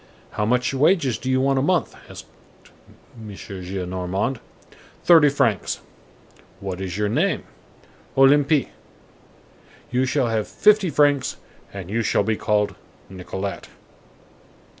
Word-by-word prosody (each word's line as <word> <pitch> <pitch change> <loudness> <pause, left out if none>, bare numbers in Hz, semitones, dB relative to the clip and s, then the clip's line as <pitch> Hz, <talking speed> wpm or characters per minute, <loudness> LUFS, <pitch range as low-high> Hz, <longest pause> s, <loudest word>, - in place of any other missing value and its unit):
"How 105 - -2
much 125 +3 +1
wages 140 - +2
do 130 - -4
you 130 0 +2
want 135 0 +2
a - - +1
month?" 175 +4 0
asked - - -10 0.9
M. 110 -3 -10
Gillenormand. 95 +5 -4 0.6
"Thirty 160 -4 +6
francs." 115 -8 0 0.8
"What 95 -1 -5
is 95 -1 -4
your 105 0 0
name?" 155 - 0 0.7
"Olympie." 140 +2 +4 1.2
"You 125 +1 +1
shall 130 -2 0
have 110 -2 -1
fifty 210 -3 +3
francs, 145 -2 +2 0.3
and 95 -2 -8
you 115 +2 0
shall 105 - +1
be 110 +2 0
called 105 -1 0 0.4
Nicolette." 95 +1 -6
120 Hz, 120 wpm, -22 LUFS, 100-140 Hz, 1.2 s, Thirty